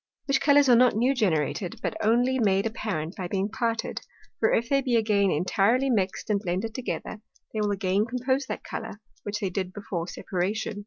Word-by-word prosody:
Which 275 0 +1
Colours 285 0 +5
are 245 - +7
not 245 -2 +5
new 245 +5 +3
generated, 180 - 0
but - - -2
only 245 +4 +3
made 195 -2 +2
apparent 200 -7 -3
by 185 -3 -4
being 195 +2 -1
parted; 230 0 -2 0.4
for - - +3
if 235 - +1
they 275 +1 +2
be 250 -3 0
again 210 -3 +3
intirely 210 - +2
mix'd 200 -1 -1
and 205 - +2
blended 195 +3 -3
together, 225 -3 -5 0.3
they 215 - -1
will 210 - +1
again 200 +1 +1
compose 260 +3 -1
that - - -5
Colour, 220 -2 -6 0.2
which 210 +2 -4
they 195 -2 -1
did 185 0 -3
before 185 -4 -5
separation. 200 +4 -3
215 Hz, 190 wpm, -26 LUFS, 195-240 Hz, 0.4 s, are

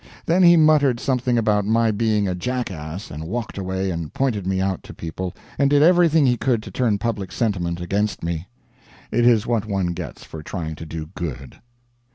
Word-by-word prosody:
Then 175 +3 +3
he 175 -1 +7
muttered 150 -6 +4
something 125 -2 0
about 105 -2 +2
my 115 +2 +2
being 105 -1 +1
a 90 - 0
jackass, 90 -4 -4
and 75 +1 -6
walked 115 +1 -4
away 95 0 -2
and 85 -3 -4
pointed 110 -8 -1
me 95 0 0
out 95 -1 -1
to - - -12
people, 85 +2 -5 0.2
and 140 -1 +4
did 145 0 +5
everything 165 -3 +5
he 125 -2 +3
could 115 -3 0
to 105 - -9
turn 110 -1 +1
public 100 -4 -3
sentiment 90 -6 -1
against 100 +4 -1
me. 85 +1 -3 0.6
It 120 +2 +3
is 115 -2 +4
what 115 -3 0
one 95 -4 -1
gets - - -7
for 80 - -9
trying 80 -1 -5
to 80 - -8
do 80 0 -6
good. 70 -8 -6
105 Hz, 195 wpm, -22 LUFS, 90-120 Hz, 0.6 s, he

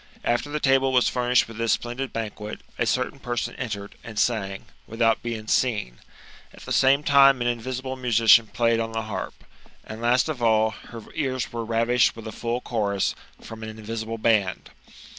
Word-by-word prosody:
After 120 +5 0
the 150 +1 -2
table 135 -1 +3
was 125 -1 +3
furnished 125 0 +2
with 115 -1 -11
this 115 -1 +2
splendid 125 +3 -3
banquet, 105 -1 -5 0.2
a - - +1
cer - - 0
tain - - -19
person 120 -1 -3
entered, 105 -5 -5
and 110 -2 -9
sang, 100 -5 -1 0.2
without 115 0 +1
being 115 -2 -5
seen; 105 - 0 0.5
at - - -15
the - - -9
same 135 +2 +4
time 140 -2 +6
an 120 - -2
invisible 130 +2 -3
musician 115 -2 +5
played 115 +1 +1
on 115 0 -3
the 115 0 -2
harp; 110 -1 -6 0.4
and, 110 +1 -8
last 120 +4 +3
of 150 -6 -4
all, 110 -1 +3
her 115 +2 -11
ears 130 -6 -2
were 115 -1 -3
ravished 115 +2 +2
with 115 - -10
a 110 - -5
full 120 +3 -3
chorus, 100 -5 -1 0.3
from 115 0 -10
an 110 - -6
invisible 110 +1 -5
band. 110 -4 +1
115 Hz, 180 wpm, -24 LUFS, 110-125 Hz, 0.5 s, time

